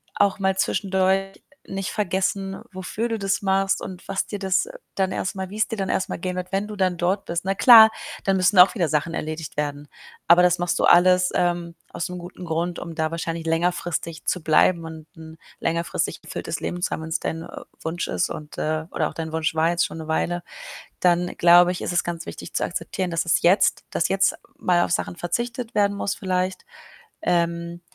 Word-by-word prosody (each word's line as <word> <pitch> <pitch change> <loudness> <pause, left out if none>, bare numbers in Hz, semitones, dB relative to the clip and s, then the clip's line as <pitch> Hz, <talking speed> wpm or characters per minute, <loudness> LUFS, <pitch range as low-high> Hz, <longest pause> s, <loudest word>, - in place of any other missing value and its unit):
auch 200 0 +2
mal 190 0 +1
zwischendurch 190 0 0 0.3
nicht 195 -1 -3
vergessen, 195 -1 -1
wofür 190 +5 -4
du 225 -2 -2
das 195 -1 0
machst 195 0 +1
und 185 -1 -8
was 195 -1 -1
dir 205 - -6
das 190 - +1 0.3
dann 190 -1 0
erst 185 - -3
mal 190 -1 -4
wie's 215 +2 0
dir - - -4
dann 195 -1 -2
erst 190 - 0
mal - - -3
gehen 180 +1 -4
wird, 180 +1 -5
wenn 195 +2 0
du 210 -1 -8
dann 185 -2 +1
dort 185 +3 0
bist. 170 0 -3
Na 195 +1 0
klar, 220 -1 +9 0.3
dann 195 -1 +2
müssen 185 +1 +2
auch 180 - +8
wieder 175 -6 +1
Sachen 155 +2 0
erledigt 155 -1 -5
werden. 145 0 -3 0.4
Aber 175 +1 +8
das 180 0 +3
machst 175 0 0
du - - +3
alles, 180 +1 +5
ähm, 175 -1 0 0.2
aus'm 180 +2 -4
guten 180 +1 -9
Grund, 170 +1 -2
um 165 - -7
da 160 0 -1
wahrscheinlich 165 0 -4
längerfristig 165 0 -1
zu 180 - -1
bleiben 165 +2 +3
und 160 -1 -9
'n 160 0 -11 0.2
längerfristig 170 +1 -2
erfülltes - - -5
Leben 175 - -4
zu - - -1
haben, 160 - -3
wenn's 160 +1 -2
dein 165 +1 -4 0.4
Wunsch 165 +2 -3
ist, 90 - -1
und, 150 0 -8
äh 155 0 -1
oder - - 0
auch - - -12
dein 160 -1 -5
Wunsch 160 -1 0
war, 160 +1 +2
jetzt 175 0 +1
schon - - -7
'ne 160 - -7
Weile, 175 +2 -1 0.6
dann 180 0 +3
glaube 175 +1 +6
ich, 180 - -6
ist - - -2
es 175 - +1
ganz 170 -1 -5
wichtig - - -9
zu - - 0
akzeptieren, 185 +1 -3
dass 165 0 0
es 165 - +2
jetzt 185 +4 +4
dass - - +1
jetzt 195 -1 +2 0.2
mal 175 -1 +2
auf - - -2
Sachen 175 - -2
verzichtet 235 +6 -3
werden 200 -1 +2
muss 200 - -2
vielleicht. 185 -2 -2 0.6
Ähm, 170 0 -1
180 Hz, 205 wpm, -23 LUFS, 165-190 Hz, 0.6 s, klar